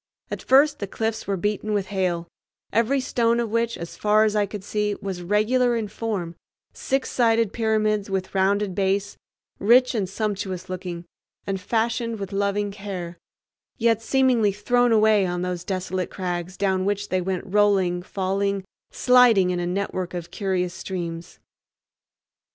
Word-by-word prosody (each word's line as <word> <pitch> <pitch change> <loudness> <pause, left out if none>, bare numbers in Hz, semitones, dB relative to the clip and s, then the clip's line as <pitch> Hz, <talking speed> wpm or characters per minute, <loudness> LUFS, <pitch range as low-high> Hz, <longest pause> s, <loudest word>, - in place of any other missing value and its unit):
At - - -4
first 285 +3 +4
the 200 - -3
cliffs 220 +2 -3
were 200 -1 0
beaten 210 +2 -1
with 195 -2 -1
hail, 175 -3 -1 0.5
every 235 +5 +2
stone 235 -2 +1
of 230 -3 -2
which, 230 0 0
as 170 0 -7
far 210 +1 +3
as 215 -1 +1
I 205 -1 +2
could 205 -1 -7
see, 210 0 -1
was 190 -3 -5
regular 230 +6 +2
in 225 -2 -2
form, 205 -6 -3 0.4
six 270 0 -2
sided 230 -3 +2
pyramids 215 -2 +1
with 190 -1 -3
rounded 195 +1 +1
base, 195 +1 0 0.4
rich 250 +5 +5
and 200 -6 -1
sumptuous 195 -3 -3
looking, 180 -2 -5 0.4
and 195 -1 -3
fashioned 230 +2 -1
with 195 -1 -6
loving 200 +1 0
care, 190 -4 -6 0.6
yet 230 -2 +2
seemingly 245 -4 +3
thrown 245 +4 +2
away 215 -3 +4
on 175 0 -2
those 180 -1 -3
desolate 185 -1 -3
crags 180 -1 -4
down 190 -2 +1
which 205 +1 -1
they 185 0 +1
went 185 0 -2
rolling, 195 -3 +2
falling, 195 +1 -1 0.3
sliding 240 -7 +5
in 180 - -1
a 175 - -2
network 185 -1 -3
of 175 -1 -6
curious 185 -3 -1
streams. 170 -3 -6
200 Hz, 155 wpm, -24 LUFS, 185-220 Hz, 0.6 s, rich